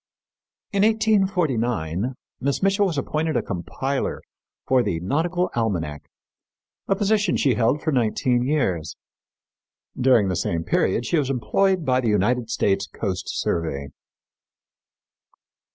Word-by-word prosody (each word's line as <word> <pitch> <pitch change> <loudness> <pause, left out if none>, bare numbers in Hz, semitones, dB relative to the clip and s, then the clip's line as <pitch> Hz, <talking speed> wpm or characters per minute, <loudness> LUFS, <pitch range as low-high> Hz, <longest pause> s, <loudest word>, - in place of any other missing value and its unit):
In 200 - +1
1849 150 - +1 0.2
Miss 140 +6 -1
Mitchell 195 +1 +3
was 165 -5 -3
appointed 155 +2 -1
a 115 - 0
compiler 115 +10 -3 0.4
for 130 -1 +4
the 100 -8 -1
Nautical 165 - 0
Almanac, 85 -11 -2 0.8
a 195 - +2
position 205 -1 +1
she 135 - +3
held 120 +6 +1
for 155 - 0
nineteen 125 0 +1
years. 120 - -1 1.0
During 125 -5 +4
the 90 - -1
same 85 -1 -1
period 95 +6 +1
she 165 - +1
was 140 -3 -1
employed 180 +7 +1
by 130 -1 +2
the 120 - 0
United 115 +4 +1
States 100 -3 +1
Coast 95 -3 -4
Survey. 70 -5 -2
125 Hz, 120 wpm, -23 LUFS, 100-165 Hz, 1.0 s, for